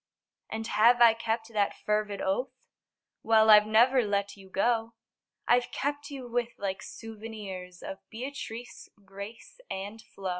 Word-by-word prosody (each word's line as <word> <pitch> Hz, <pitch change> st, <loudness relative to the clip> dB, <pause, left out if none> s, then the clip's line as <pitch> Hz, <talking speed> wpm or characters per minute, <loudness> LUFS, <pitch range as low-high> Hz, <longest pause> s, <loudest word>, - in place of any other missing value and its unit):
And 225 Hz, 0 st, -4 dB
have 230 Hz, +2 st, +5 dB
I 235 Hz, -2 st, +8 dB
kept 225 Hz, 0 st, -2 dB
that 205 Hz, -2 st, +1 dB
fervid 210 Hz, -1 st, -1 dB
oath? 195 Hz, +8 st, 0 dB, 0.7 s
Well 220 Hz, -1 st, +5 dB
I've 210 Hz, 0 st, +8 dB
never 245 Hz, +4 st, +5 dB
let 200 Hz, -2 st, -1 dB
you 195 Hz, -1 st, -15 dB
go: 225 Hz, +3 st, 0 dB, 0.5 s
I've 245 Hz, 0 st, +3 dB
kept 290 Hz, +1 st, -3 dB
you 270 Hz, -3 st, -7 dB
with 240 Hz, 0 st, -1 dB
like 195 Hz, -1 st, -3 dB
souvenirs 210 Hz, -5 st, -8 dB
Of 190 Hz, -, -6 dB
Beatrice, 245 Hz, -1 st, -7 dB, 0.2 s
Grace 200 Hz, -, -10 dB
and 205 Hz, +3 st, -5 dB
Flo. 195 Hz, -3 st, -7 dB
220 Hz, 140 wpm, -29 LUFS, 200-240 Hz, 0.7 s, I